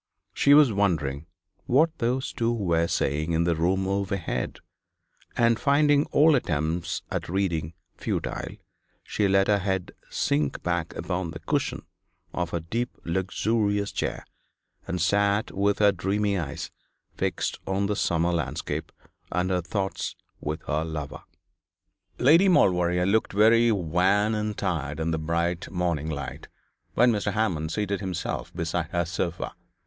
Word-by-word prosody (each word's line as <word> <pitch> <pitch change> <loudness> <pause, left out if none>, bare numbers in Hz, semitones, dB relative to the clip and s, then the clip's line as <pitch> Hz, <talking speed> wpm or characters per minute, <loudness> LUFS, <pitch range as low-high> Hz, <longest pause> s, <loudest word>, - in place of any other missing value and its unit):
She 140 0 +5
was 145 -6 +6
wondering 80 -7 0 0.4
what 155 +6 +3
those 125 +3 -1
two 115 0 0
were 85 -7 +1
saying 75 +3 0
in 80 +1 +2
the 85 -1 +1
room 95 +4 +1
overhead, 100 -2 -2 0.8
and 115 -1 +3
finding 145 +1 +4
all 155 +2 +4
attempts 85 - -1
at - - -3
reading 85 -4 -1 0.2
futile, - - -3 0.5
she 105 - 0
let 95 0 +4
her 105 -1 +3
head 95 -1 -2 0.2
sink 75 -1 0
back 85 -2 -1
upon 90 -2 -3
the 80 - -7
cushion - - -1 0.5
of 90 -1 -2
her 85 - -2
deep 115 +10 -3
luxurious 100 +3 0
chair, - - -3 0.6
and 90 - -2
sat 100 +5 +2
with 100 +1 +1
her 105 -1 +5
dreamy 100 +2 0
eyes 80 -7 -4 0.4
fixed - - -2
on 95 +1 0
the 105 +1 0
summer 85 -2 +1
landscape 85 -5 -3 0.4
and 90 +2 0
her 90 -1 +1
thoughts 95 +2 -3 0.2
with 75 +2 -4
her 75 +1 -1
lover. 75 -3 -5 1.0
Lady 165 +9 +6
Maulevrier 90 - +3
looked 105 +3 +1
very 115 +3 +5
wan 95 +3 +2
and 105 -1 -2
tired 75 -3 -2
in 80 +1 0
the 80 - -1
bright 85 +2 -1
morning 85 -4 -1
light, 70 -4 -5 0.5
when 120 0 +5
Mr. 105 -3 -1
Hammond 85 -8 0
seated 100 0 -1
himself 95 -3 -4
beside 85 -1 -2
her 85 0 0
sofa. 85 0 -3
95 Hz, 140 wpm, -26 LUFS, 85-105 Hz, 1.0 s, was